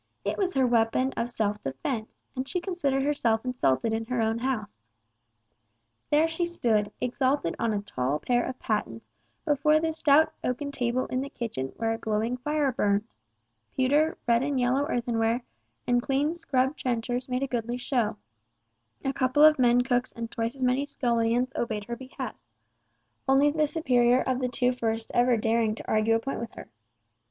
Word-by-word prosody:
It - - 0
was 375 -2 -1
her 265 -1 +4
weapon 240 +2 +2
of 230 +1 -1
self 210 -3 -1
defence, 215 - -4 0.2
and 260 +1 -4
she 360 - 0
considered 290 -8 -1
herself 240 -6 +1
insulted 230 - +1
in 225 0 -2
her 250 0 -1
own 225 0 +1
house. 235 - -3 1.3
There 305 +2 +4
she 325 +2 -2
stood, 225 -11 0
exalted 255 -6 0
on 230 - +1
a 205 -1 -2
tall 130 -6 -1
pair 245 +7 +1
of 255 - -5
pattens 115 - -3 0.4
before 300 +1 +3
the 320 0 -1
stout 310 0 +4
oaken 285 +3 -2
table 250 -1 0
in 255 - -2
the 275 - -5
kitchen 220 - -4
where 225 0 0
a 225 - -5
glowing 220 +3 -1
fire 295 +1 0
burned; 205 -2 +1 0.7
pewter, 290 +5 +2
red 235 0 +4
and 275 -1 0
yellow 260 +4 +1
earthenware, 235 -2 0 0.4
and 245 0 +2
clean 280 +4 0
scrubbed 270 -5 0
trenchers 245 +1 -2
made 250 +1 -1
a - - 0
goodly 240 -1 -2
show, 245 -3 0 0.9
a 270 - 0
couple 260 +2 +3
of 305 -2 +7
men 245 -1 +5
cooks 245 0 0
and 230 -1 -6
twice 230 +2 -2
as 265 - -5
many 255 +3 +1
scullions 240 -1 0
obeyed 215 -3 -2
her 235 +3 -5
behests—only 270 +2 -3
the 305 0 +1
superior 250 -5 +3
of 255 -1 -1
the 250 -1 -1
two 250 +1 +1
first 225 -2 -2
ever 245 0 +3
daring 225 0 +1
to - - -9
argue 220 +1 +2
a - - +2
point 270 +4 -4
with 235 - -6
her. - - -11
245 Hz, 175 wpm, -27 LUFS, 225-270 Hz, 1.3 s, of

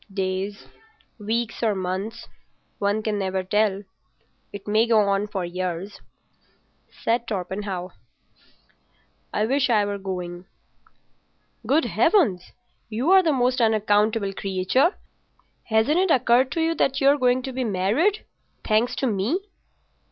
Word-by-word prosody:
"Days, 195 +1 -3 0.5
weeks, 225 +2 -2
or 220 -3 +1
months. 190 +4 -4 0.5
One 205 +2 0
can 210 -2 -1
never 190 -1 -2
tell. 205 +1 +1 0.7
It 200 0 -9
may 215 +3 +3
go 225 -2 +4
on 200 0 0
for 195 -3 -3
years." 180 +2 -5 1.1
"I 230 +2 +3 2.2
wish 270 +3 +1
I 215 -3 +3
were 200 0 -4
going." 180 -2 -6 1.2
"Good 290 +6 +3
Heavens! 210 - +2 0.4
You're 295 - +4
the 330 -4 +1
most 255 -2 +1
unaccountable 215 -2 +2
creature! 195 - +1 0.7
Hasn't 225 +9 +2
it 380 0 +2
occurred 255 -2 +3
to 330 - -1
you 325 +1 +1
that 275 -4 0
you're 280 +1 +4
going 250 0 +2
to 265 - -5
be 260 0 -2
married—thanks 230 - -1
to - - -2
me?" 220 - 0
215 Hz, 115 wpm, -24 LUFS, 195-255 Hz, 2.2 s, go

